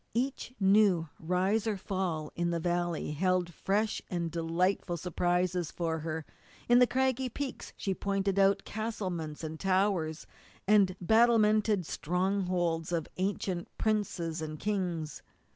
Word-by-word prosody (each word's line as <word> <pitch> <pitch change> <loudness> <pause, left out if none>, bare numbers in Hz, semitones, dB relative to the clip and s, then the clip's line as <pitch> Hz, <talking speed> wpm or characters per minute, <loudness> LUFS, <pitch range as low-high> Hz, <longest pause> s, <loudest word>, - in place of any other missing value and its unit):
Each 255 +1 -1
new 195 -5 +4
rise 185 +6 +1
or 210 -2 0
fall 180 -5 -2
in 170 0 0
the 170 -1 0
valley 175 -2 -1
held 180 +2 0
fresh 205 +6 0
and 170 -3 -2
delightful 175 +2 0
surprises 175 0 0
for 165 -2 -2
her; 160 0 -4 0.4
in 240 0 +6
the 250 - +6
craggy 260 0 +1
peaks 270 +3 -5
she 195 - -1
pointed 195 +1 0
out 195 0 +4
castlements, 185 -9 -4
and 160 0 -5
towers, 185 -4 +1 0.4
and 200 -3 +5
battlemented 215 -1 +4
strongholds 180 -1 -1
of 165 -2 -1
ancient 185 -2 -2
princes 180 -7 -1
and 155 -1 -5
kings. 175 -7 -2
185 Hz, 125 wpm, -31 LUFS, 170-205 Hz, 0.4 s, in